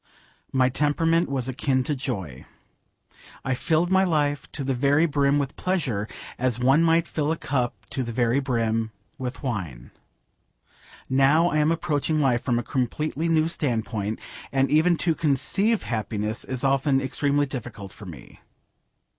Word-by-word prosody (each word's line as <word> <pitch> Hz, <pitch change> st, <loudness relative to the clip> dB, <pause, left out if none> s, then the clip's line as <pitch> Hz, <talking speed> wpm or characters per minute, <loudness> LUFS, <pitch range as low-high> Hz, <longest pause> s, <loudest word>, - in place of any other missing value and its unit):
My 130 Hz, -1 st, +3 dB
temperament 165 Hz, +5 st, +1 dB
was 130 Hz, -3 st, -1 dB
akin 130 Hz, 0 st, 0 dB
to 150 Hz, -, -1 dB
joy. 95 Hz, -, -4 dB, 1.0 s
I 135 Hz, -, +1 dB
filled 160 Hz, +7 st, +1 dB
my 190 Hz, 0 st, +5 dB
life 145 Hz, -5 st, 0 dB
to 140 Hz, -, -3 dB
the 135 Hz, 0 st, 0 dB
very 140 Hz, +5 st, +3 dB
brim 140 Hz, -2 st, +2 dB
with 140 Hz, -1 st, -2 dB
pleasure, 140 Hz, -, -1 dB, 0.3 s
as 125 Hz, -2 st, +1 dB
one 135 Hz, +5 st, +4 dB
might 165 Hz, 0 st, +3 dB
fill 150 Hz, 0 st, -1 dB
a 165 Hz, -, -1 dB
cup 125 Hz, -5 st, -1 dB, 0.2 s
to 135 Hz, -, -1 dB
the 120 Hz, -2 st, -3 dB
very 120 Hz, +2 st, +2 dB
brim 115 Hz, -4 st, 0 dB, 0.3 s
with 125 Hz, +1 st, -5 dB
wine. 90 Hz, -, -4 dB, 1.2 s
Now 140 Hz, +6 st, +4 dB
I 155 Hz, -, +1 dB
am 150 Hz, +2 st, +3 dB
approaching 155 Hz, -2 st, 0 dB
life 125 Hz, -5 st, +2 dB
from 120 Hz, -3 st, 0 dB
a 120 Hz, -, -1 dB
completely 150 Hz, +7 st, -1 dB
new 160 Hz, -1 st, +3 dB
standpoint, 110 Hz, -8 st, -2 dB, 0.3 s
and 135 Hz, 0 st, +1 dB
even 160 Hz, +3 st, +4 dB
to 165 Hz, -1 st, +1 dB
conceive 170 Hz, -, +1 dB
happiness 110 Hz, -1 st, -3 dB
is 130 Hz, 0 st, -4 dB
often 135 Hz, 0 st, +2 dB
extremely 145 Hz, +2 st, +1 dB
difficult 115 Hz, -7 st, -7 dB
for 105 Hz, -, -11 dB
me. 75 Hz, -8 st, -12 dB
135 Hz, 155 wpm, -25 LUFS, 120-155 Hz, 1.2 s, my